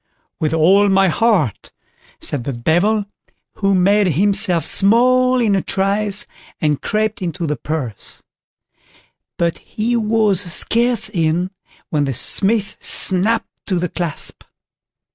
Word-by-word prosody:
"With 155 - -1
all 190 +6 +3
my 195 -1 +3
heart", 180 - 0 0.5
said 135 -4 -3
the 140 - -4
Devil, 175 - 0 0.5
who 195 -1 +1
made 200 +2 +3
himself 185 0 +2
small 255 +6 +3
in 215 -4 +2
a 190 - 0
trice, 200 +2 0 0.3
and 150 -2 -1
crept 215 -1 -2
into 175 -1 -4
the 150 -1 -2
purse; 130 -6 -6 1.1
but 170 -1 -1
he 230 +3 -3
was 215 -4 +1
scarce 235 +4 +2
in 175 -1 -1 0.4
when 150 -2 0
the 135 -2 -3
Smith 205 - +2
snapped 205 +5 +1 0.2
to 185 - 0
the 175 0 -2
clasp. 170 -5 -4
195 Hz, 125 wpm, -18 LUFS, 165-215 Hz, 1.1 s, all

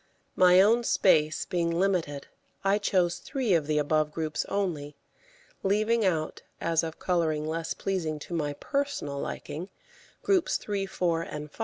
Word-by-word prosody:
My 180 0 +6
own 230 +4 +4
space 155 -8 +3
being 170 -2 0
limited, 170 -5 0 0.4
I 195 +1 +3
chose 180 -4 +1
three 260 -8 -1
of 160 -4 +2
the 155 -1 +1
above 150 +1 +1
groups 155 0 -2
only, 160 -8 -2 0.7
leaving 215 +3 +2
out, 160 -5 0 0.2
as 165 -1 +1
of 160 0 -5
colouring 160 -4 0
less 160 +1 -3
pleasing 170 -6 -2
to 175 - -8
my 150 -3 -1
personal 275 - -2
liking, 165 +6 -5 0.5
groups 375 -4 +2
3, 200 -2 -3
4, 170 -3 0
and 150 -2 -6
5. - - -21
170 Hz, 150 wpm, -28 LUFS, 155-195 Hz, 0.7 s, My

